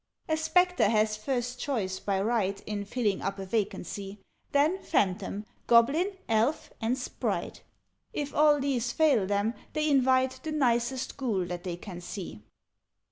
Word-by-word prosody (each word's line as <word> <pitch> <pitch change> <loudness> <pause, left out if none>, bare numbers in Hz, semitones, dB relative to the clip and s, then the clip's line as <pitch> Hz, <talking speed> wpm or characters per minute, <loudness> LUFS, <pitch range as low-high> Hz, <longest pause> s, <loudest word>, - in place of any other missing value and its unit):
"A 315 - +2
Spectre 320 - +3
has 215 -1 +2
first 245 +2 -2
choice, 195 -10 -2
by 195 -2 -1
right, 200 -2 0
In 205 -1 -4
filling 210 -2 0
up 195 0 -2
a 195 - -5
vacancy; 200 -1 -3 0.3
Then 310 +7 +2
Phantom, 195 +1 0 0.2
Goblin, 295 - +4
Elf, 225 +7 +1
and 230 +3 +1
Sprite 250 - -3 0.5
If 290 -8 -4
all 300 -1 +5
these 255 -4 0
fail 270 -10 +3
them, 205 +3 +1 0.2
they 305 0 +1
invite 260 -2 +3
The 315 - -4
nicest 250 -2 0
Ghoul 220 -9 0
that 175 0 -5
they 175 -2 -3
can 175 -1 -8
see. 175 - -7
235 Hz, 145 wpm, -29 LUFS, 200-280 Hz, 0.5 s, all